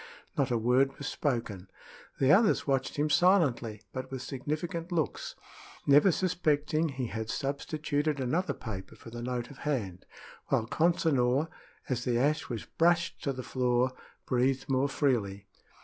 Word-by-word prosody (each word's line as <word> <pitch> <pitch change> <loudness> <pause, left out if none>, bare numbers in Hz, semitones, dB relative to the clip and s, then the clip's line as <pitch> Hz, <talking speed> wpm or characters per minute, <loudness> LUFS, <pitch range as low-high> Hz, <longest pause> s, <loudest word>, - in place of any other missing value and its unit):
Not 140 -3 +1
a 120 - +1
word 125 +4 +2
was 145 - -7
spoken. 115 -10 -2 0.5
The 135 +1 +4
others 210 +6 +4
watched 135 -2 0
him 150 +1 +1
silently, 135 - +3
but 130 0 -5
with 130 -1 -5
significant 165 +7 -4
looks, 165 -4 -2 0.5
never 145 +7 +6
suspecting 160 -3 +1
he 135 -2 -3
had 110 0 -4
substituted 145 +2 -1
another 160 +9 0
paper 100 -5 -7
for 115 - -12
the 120 0 -6
note 125 0 -3
of 140 - -13
hand, 105 -12 -3 0.4
while 110 - +1
Consinor, 150 -2 +2 0.4
as 125 -2 -1
the 125 -2 +1
ash 145 +5 +1
was 115 -3 -4
brushed 170 0 +1
to 140 - +1
the 130 -1 -5
floor, 125 0 +1 0.3
breathed 130 +2 +1
more 135 0 +1
freely. 105 -9 0
135 Hz, 150 wpm, -30 LUFS, 120-155 Hz, 0.5 s, never